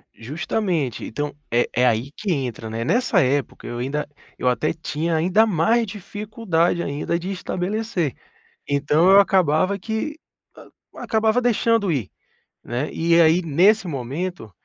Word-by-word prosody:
Justamente. 155 Hz, -, -2 dB
Então, 145 Hz, +4 st, -4 dB, 0.2 s
é 120 Hz, +1 st, +2 dB
é 125 Hz, +1 st, +3 dB
aí 120 Hz, +4 st, 0 dB
que 200 Hz, +3 st, -4 dB
entra, 125 Hz, -6 st, -3 dB
né. 115 Hz, +1 st, -3 dB
Nessa 245 Hz, -, +2 dB
época, 135 Hz, +1 st, -1 dB
eu 120 Hz, 0 st, -5 dB
ainda 145 Hz, +4 st, -2 dB, 0.3 s
eu 125 Hz, -, -2 dB
até 125 Hz, +5 st, +1 dB
tinha 160 Hz, +1 st, -2 dB
ainda 185 Hz, +7 st, +3 dB
mais 220 Hz, +5 st, +2 dB
dificuldade 200 Hz, -4 st, -1 dB
ainda 145 Hz, +4 st, -2 dB
de 185 Hz, +3 st, -5 dB
estabelecer. 185 Hz, -, -2 dB, 0.6 s
Então 150 Hz, +5 st, +2 dB
eu 200 Hz, +1 st, +8 dB
acabava 185 Hz, 0 st, +2 dB
que, 220 Hz, -, -4 dB, 0.4 s
hã, -, -, -14 dB, 0.3 s
acabava 220 Hz, +2 st, +1 dB
deixando 230 Hz, -5 st, +2 dB
ir, 120 Hz, -10 st, -2 dB, 0.5 s
né. 125 Hz, +5 st, -3 dB
E 170 Hz, +1 st, +3 dB
aí, 165 Hz, +2 st, +5 dB
nesse 185 Hz, +7 st, +3 dB
momento 140 Hz, -, -4 dB
170 Hz, 140 wpm, -22 LUFS, 140-200 Hz, 0.6 s, eu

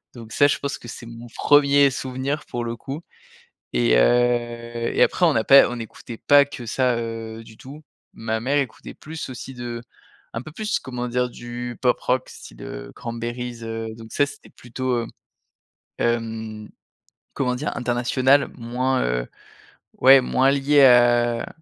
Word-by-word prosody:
Donc 115 Hz, -2 st, -11 dB
ça, 145 Hz, +6 st, +4 dB
je 145 Hz, -, +1 dB
pense 140 Hz, 0 st, -4 dB
que 120 Hz, -, -13 dB
c'est 115 Hz, -, -9 dB
mon 115 Hz, +1 st, -10 dB
1er 140 Hz, -1 st, +5 dB
souvenir, 130 Hz, +3 st, -3 dB
pour 120 Hz, -, -4 dB
le 115 Hz, -, -3 dB
coup 140 Hz, +6 st, -7 dB, 0.7 s
et -, -, +3 dB
heu 120 Hz, -, +1 dB
et -, -, +4 dB
après 180 Hz, -, +3 dB
on 160 Hz, -, +3 dB
n'a 110 Hz, -, +1 dB
pas 140 Hz, 0 st, +7 dB
on 120 Hz, 0 st, -5 dB
écoutait 115 Hz, +1 st, -9 dB
pas 145 Hz, +3 st, +5 dB
que 135 Hz, -4 st, -9 dB
ça, 125 Hz, +1 st, +1 dB
heu, 115 Hz, -1 st, -5 dB
du 110 Hz, -1 st, -15 dB
tout. 145 Hz, +4 st, -11 dB, 0.3 s
Ma 110 Hz, 0 st, -3 dB
mère 135 Hz, +5 st, 0 dB
écoutait 135 Hz, -5 st, -4 dB
plus 160 Hz, -1 st, -8 dB
aussi 130 Hz, +1 st, -8 dB
de 120 Hz, -1 st, -6 dB, 0.5 s
un 115 Hz, -, -4 dB
peu 155 Hz, -, -11 dB
plus, 210 Hz, +2 st, -2 dB
comment 125 Hz, -1 st, -5 dB
dire, 125 Hz, +1 st, 0 dB
du 120 Hz, 0 st, -7 dB
pop 125 Hz, -1 st, +3 dB
rock 130 Hz, 0 st, 0 dB
style, -, -, -13 dB
heu, -, -, -8 dB
Cranberries, 120 Hz, 0 st, -5 dB
heu, 115 Hz, 0 st, -4 dB
donc 115 Hz, -1 st, -12 dB
ça 145 Hz, -, +3 dB
c'était 145 Hz, -, -12 dB
plutôt, 130 Hz, +1 st, -4 dB
heu, 115 Hz, -1 st, -1 dB, 0.9 s
hem, 110 Hz, -2 st, -2 dB, 0.7 s
comment 125 Hz, -2 st, 0 dB
dire? 145 Hz, +4 st, -4 dB
International, 130 Hz, +3 st, +2 dB
moins, 125 Hz, +2 st, -1 dB
heu, -, -, -1 dB, 0.7 s
ouais, 135 Hz, 0 st, +7 dB
moins 130 Hz, +2 st, +2 dB
lié 140 Hz, 0 st, +4 dB
à 120 Hz, -2 st, +4 dB
120 Hz, 165 wpm, -23 LUFS, 115-135 Hz, 0.9 s, pas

